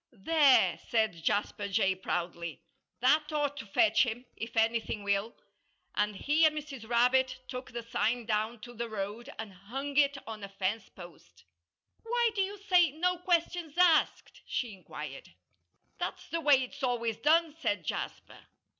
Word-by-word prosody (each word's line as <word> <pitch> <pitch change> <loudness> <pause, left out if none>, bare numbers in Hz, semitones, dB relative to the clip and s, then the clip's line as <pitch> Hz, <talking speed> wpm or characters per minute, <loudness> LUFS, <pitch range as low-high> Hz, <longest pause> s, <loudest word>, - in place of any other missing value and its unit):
"There!" 280 +5 +4
said 220 -7 +1
Jasper 205 +2 0
Jay, 195 -1 +2
proudly. 170 -3 -4 0.4
"That 300 +5 +3
ought 290 -2 0
to 225 - -7
fetch 325 - +4
him, 245 0 -4
if 225 0 -7
anything 225 -2 +1
will." 200 +3 0 0.6
And 210 0 0
he 300 +10 +2
and 310 -1 +4
Mrs. 275 -7 -7
Rabbit 255 +2 +3
took 255 0 -6
the 235 0 -5
sign 230 +1 -1
down 220 +1 -1
to 240 +2 -10
the 235 0 -4
road 215 +4 -5
and 220 -3 -7
hung 265 +10 -6
it 285 -1 +4
on 220 -2 -7
a 200 - -6
fence 195 +2 -2
post. 95 - -14 0.6
"Why 475 0 +1
do 405 - 0
you 400 +2 -2
say 365 -4 +4
'No 360 +3 0
questions 345 -2 0
asked'?" 350 -3 +3
she 240 -4 -2
inquired. 190 - -9 0.7
"That's - - -4
the 330 - -2
way 285 -4 +5
it's 250 - -9
always 235 -4 0
done," 315 +5 +3
said 205 - -1
Jasper. - - -6
240 Hz, 155 wpm, -30 LUFS, 210-300 Hz, 0.7 s, way